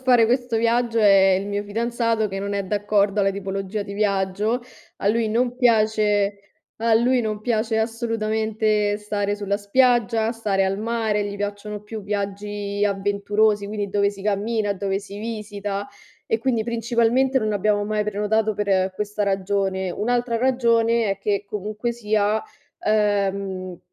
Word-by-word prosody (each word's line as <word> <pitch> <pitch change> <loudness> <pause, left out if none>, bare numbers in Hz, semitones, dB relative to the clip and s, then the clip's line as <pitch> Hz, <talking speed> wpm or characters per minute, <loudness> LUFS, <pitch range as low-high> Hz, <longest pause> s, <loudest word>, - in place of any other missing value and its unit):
a - - -22
fare 245 -3 +5
questo 245 -1 0
viaggio, 230 0 +1
è 195 -3 +6
il 195 - -5
mio 205 0 -2
fidanzato 230 +1 0
che 195 -1 -5
non 200 0 -3
è 200 -1 -1
d'accordo 205 0 +1
alla 195 0 +3
tipologia 195 +1 -4
di 200 - -7
viaggio. 205 +3 0 0.4
A - - -4
lui 225 0 +1
non 240 +2 +1
piace 215 -4 +2 0.4
al 225 0 +3
lui 250 +1 +3
non 215 -2 -3
piace 220 -1 0
assolutamente 220 -2 0
stare 205 -1 -2
sulla 200 -1 -1
spiaggia, 230 +1 +2
stare 205 -4 0
al 190 +1 0
mare, 220 -1 -1
gli 205 0 -5
piacciono 205 +1 -4
più 215 0 -7
viaggi 205 0 -3
avventurosi, 205 +1 +1
quindi 205 -1 -3
dove 200 0 +2
si 195 -1 -11
cammina, 210 +1 0
dove 195 0 -2
si 200 0 -9
visita 205 -2 -4 0.4
e 225 - +1
quindi 235 -2 0
principalmente 235 +3 +2
non 215 -3 -1
abbiamo 205 0 +1
mai 210 0 0
prenotato 210 +1 0
per 190 -2 +1
questa 210 +1 -3
ragione. 195 -1 0
Un'altra 240 +2 0
ragione, 230 -3 +2
è 195 - -2
che 200 0 -1
comunque 210 +3 -3
sia, 215 -2 0 0.4
ehm, 195 -3 0
210 Hz, 150 wpm, -23 LUFS, 200-225 Hz, 0.4 s, è